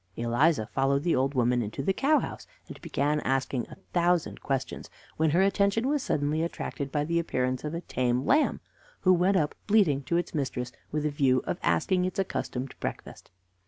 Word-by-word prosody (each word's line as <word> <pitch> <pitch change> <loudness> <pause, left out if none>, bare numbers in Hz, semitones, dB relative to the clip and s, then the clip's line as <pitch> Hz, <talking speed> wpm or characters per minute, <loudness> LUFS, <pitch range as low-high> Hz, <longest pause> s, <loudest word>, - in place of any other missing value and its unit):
Eliza 120 +2 +2
followed 135 +4 0
the 175 - +2
old 135 +2 0
woman 125 0 +2
into 105 -1 -4
the 195 - +1
cow 300 +9 +3
house, - - -5 0.2
and - - -11
began 150 +2 0
asking 135 -2 -1
a - - -10 0.2
thousand 175 -1 +1
questions, 135 -2 -3 0.3
when 160 0 +3
her 175 +6 +3
attention 200 +4 +2
was 290 0 +1
suddenly 150 - 0
attracted 145 -4 -4
by 145 -1 0
the 170 +2 +1
appearance 130 -6 -1
of 150 +2 -3
a 170 - -3
tame 125 -3 -1
lamb, 295 +3 +2 0.4
who 185 - +5
went 185 +2 +3
up 150 -4 0
bleating 195 -10 +3
to 170 +5 -1
its 175 - -2
mistress 130 -4 -2 0.2
with 150 0 -1
a 150 - +1
view 130 -3 +2
of 175 - -3
asking 185 -2 +1
its 185 +3 -3
accustomed 135 -8 -3
breakfast. - - -6
150 Hz, 190 wpm, -28 LUFS, 130-180 Hz, 0.4 s, who